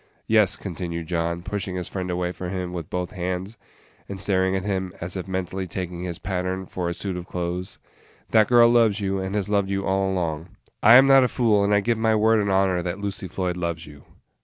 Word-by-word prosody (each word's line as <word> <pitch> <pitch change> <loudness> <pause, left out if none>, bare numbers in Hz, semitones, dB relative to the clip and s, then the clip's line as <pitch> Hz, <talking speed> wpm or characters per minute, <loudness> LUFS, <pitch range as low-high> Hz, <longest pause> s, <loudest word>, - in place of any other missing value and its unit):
Yes," 110 -3 +4
continued 85 -3 -5
John, 85 0 -2
pushing 100 -1 -4
his 90 -2 -3
friend 95 -2 -4
away 90 0 -1
from 90 0 -6
him 90 -1 -4
with 85 -3 -6
both 90 -1 -3
hands, 95 +2 -4 0.5
and 100 -1 -6
staring 95 -1 +1
at 95 - -2
him 95 -2 -2
as 85 +2 -5
if 95 0 -5
mentally 95 0 -3
taking 90 -1 -5
his 85 -2 -4
pattern 95 0 -3
for 90 -1 -3
a - - -2
suit 95 +1 -4
of 90 0 -6
clothes, 90 +1 -4 0.5
"that 110 -1 +5
girl 120 -1 +6
loves 115 -3 +3
you, 95 -1 -1
and 95 +1 -3
has 105 -2 -1
loved 100 -2 +1
you 100 0 -1
all 95 0 +1
along. 85 -2 -3 0.2
I 115 +3 +8
am 130 +2 +9
not 135 -1 +7
a - - +3
fool, 110 -5 +2
and 100 - +1
I 105 0 +4
give 115 +1 0
you - - -5
my 110 -1 +3
word 110 0 +3
and 100 - -1
honor 95 -2 +2
that 90 +1 -3
Lucy 100 -2 -4
Floyd 90 0 -3
loves 85 -2 -3
you." 75 -1 -14
95 Hz, 230 wpm, -24 LUFS, 90-100 Hz, 0.5 s, am